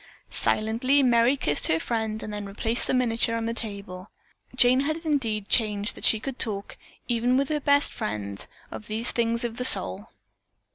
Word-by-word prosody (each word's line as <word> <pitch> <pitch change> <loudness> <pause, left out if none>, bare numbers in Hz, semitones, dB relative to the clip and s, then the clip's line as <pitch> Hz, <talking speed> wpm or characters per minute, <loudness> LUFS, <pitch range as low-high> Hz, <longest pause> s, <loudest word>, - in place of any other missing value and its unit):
Silently 240 +6 +1
Merry 240 +2 +3
kissed 150 - +1
her 160 - +1
friend 220 +1 -3
and 210 - -6
then 205 0 -5
replaced 225 +4 -2
the - - 0
miniature 230 -2 +1
on 230 0 -2
the 230 - -2
table. 200 -4 -4 0.5
Jane 250 +1 +5
had 310 +3 -1
indeed 225 -9 -1
changed 210 -2 +1
that - - -5
she 220 - +5
could 265 +2 -6
talk, 200 -4 -3 0.3
even 245 +1 +1
with 275 0 0
her 305 -1 0
best 285 0 +2
friend, 100 -1 -5 0.2
of 215 - -9
these 220 +3 -1
things 230 0 -1
of 235 -1 -4
the 250 - -2
soul. 95 - +2
230 Hz, 180 wpm, -25 LUFS, 210-250 Hz, 0.5 s, Jane